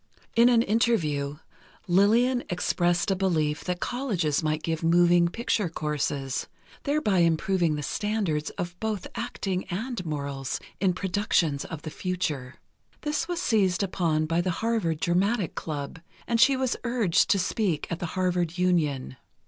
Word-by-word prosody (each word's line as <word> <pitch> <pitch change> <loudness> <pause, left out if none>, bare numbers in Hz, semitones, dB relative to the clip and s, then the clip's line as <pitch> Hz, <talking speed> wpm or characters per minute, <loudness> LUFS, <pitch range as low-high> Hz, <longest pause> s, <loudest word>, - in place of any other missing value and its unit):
In 235 +1 +6
an 235 -2 +4
interview, 155 -11 +1 0.5
Lillian 230 +7 +3
expressed 175 0 +1
a - - +2
belief 160 -6 0
that 180 -1 -2
colleges 190 - 0
might 155 0 -1
give 160 -1 -2
moving 175 +1 +4
picture 210 -1 -1
courses, 145 -4 -2 0.4
thereby 280 -10 +2
improving 170 0 +2
the 150 - -4
standards 195 -4 -1
of 175 0 -4
both 215 -4 -2
acting 200 -6 -3
and 220 +3 -4
morals 140 -4 -3 0.2
in 190 -2 +2
productions 175 -6 0
of 160 -2 -7
the 155 - -6
future. 150 -9 -3 0.5
This 300 +2 -1
was 350 -1 -2
seized 205 - +2
upon 165 -5 0
by 165 +2 +1
the 185 - -1 0.2
Harvard 205 -9 0
Dramatic 185 +4 +1
Club, 145 -1 -5 0.3
and 230 -1 +1
she 270 +1 +6
was 260 -2 0
urged 235 -8 +2
to 200 - +4
speak 185 -4 0
at 170 - -2
the 175 - -3
Harvard 180 -2 0
Union. 150 -8 0
180 Hz, 145 wpm, -27 LUFS, 155-215 Hz, 0.5 s, In